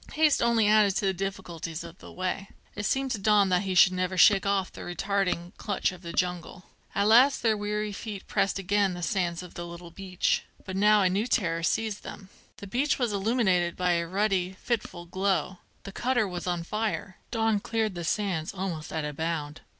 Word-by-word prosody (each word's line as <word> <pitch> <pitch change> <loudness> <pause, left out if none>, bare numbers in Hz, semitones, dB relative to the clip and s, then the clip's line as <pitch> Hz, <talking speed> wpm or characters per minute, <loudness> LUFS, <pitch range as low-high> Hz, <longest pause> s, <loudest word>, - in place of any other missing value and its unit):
Haste 305 -2 +3
only 235 -2 +3
added 210 -2 +4
to 200 - 0
the 190 - +2
difficulties 175 -4 -5
of 165 - -11
the - - -12
way. 185 +2 -3 0.2
It 205 -1 -2
seemed 270 +3 0
to 215 - -1
Don 205 -1 +4
that 180 -1 +3
he 190 -2 -2
should 185 +1 +7
never 185 0 -1
shake 195 +2 +6
off 195 -1 0
the - - -9
retarding 180 -1 -1
clutch 205 -4 -1
of 185 -2 -12
the 170 -2 -7
jungle. 180 0 -2 0.3
At 200 - +2
last 250 +5 +5
their 225 -2 +3
weary 210 0 -2
feet 205 -1 -7
pressed 195 - 0
again 195 0 +1
the 175 - -6
sands 175 0 -1
of 180 - -11
the 175 0 -6
little 170 0 -10
beach. 185 0 -1 0.2
But 190 - -5
now 210 +1 +5
a - - +4
new 205 +5 0
terror 170 -9 0
seized 215 +4 -1
them. 195 - -10 0.3
The - - -9
beach 255 +9 0
was 240 -5 0
illuminated 195 -5 +1
by 180 -1 +1
a 170 -1 0
ruddy, 190 -1 0
fitful 210 -7 -3
glow..The 190 +1 -3
cutter 245 0 0
was 180 -1 -5
on 175 -1 -1
fire! 210 -1 -3
Don 225 -2 +1
cleared 225 -1 -1
the 175 -1 -5
sands 180 -2 -1
almost 180 -5 -4
at 160 -2 -2
a 150 - -4
bound. 160 -1 -3
195 Hz, 200 wpm, -27 LUFS, 175-210 Hz, 0.3 s, should